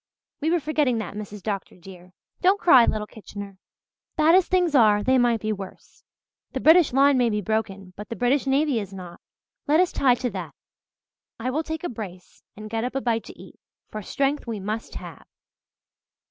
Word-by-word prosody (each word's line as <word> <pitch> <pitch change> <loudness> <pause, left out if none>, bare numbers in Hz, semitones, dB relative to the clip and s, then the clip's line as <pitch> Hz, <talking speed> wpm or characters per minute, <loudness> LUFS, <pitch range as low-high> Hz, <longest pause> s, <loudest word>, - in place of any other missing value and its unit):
We 310 - -1
were 345 +1 +2
forgetting 295 -5 0
that, 220 - -5
Mrs. 210 -1 -8
Dr. 200 -3 -4
dear. 180 0 -14 0.3
Don't 380 +2 +3
cry, 260 -11 +6
little 215 0 -1
Kitchener. 200 -2 -10 0.6
Bad 315 +1 +5
as 370 0 +5
things 360 -4 +1
are, 210 -6 +4
they 260 +2 +3
might 240 -2 +2
be 215 0 -1
worse. 195 -2 -11 0.5
The - - -2
British 325 0 +5
line 275 +1 +4
may 240 -1 +3
be 210 -1 -1
broken 200 -3 -3
but 210 - -9
the 230 - -4
British 255 +4 +1
navy 275 -2 +2
is 200 -2 -7
not. 180 -2 -10 0.5
Let 305 +3 +4
us 365 -1 +3
tie 255 -3 +3
to 245 -1 -3
that. 185 -4 -7 0.8
I 250 +3 -2
will 300 +4 0
take 320 0 -6
a 350 - -2
brace 190 -6 -9 0.2
and 215 0 -8
get 225 +1 -3
up 250 +2 -4
a 270 - 0
bite 230 -3 -1
to - - -13
eat, - - -14 0.3
for 215 - -5
strength 275 +6 -1
we 225 -3 -4
must 215 +3 -5
have." - - -10
230 Hz, 195 wpm, -24 LUFS, 205-285 Hz, 0.8 s, cry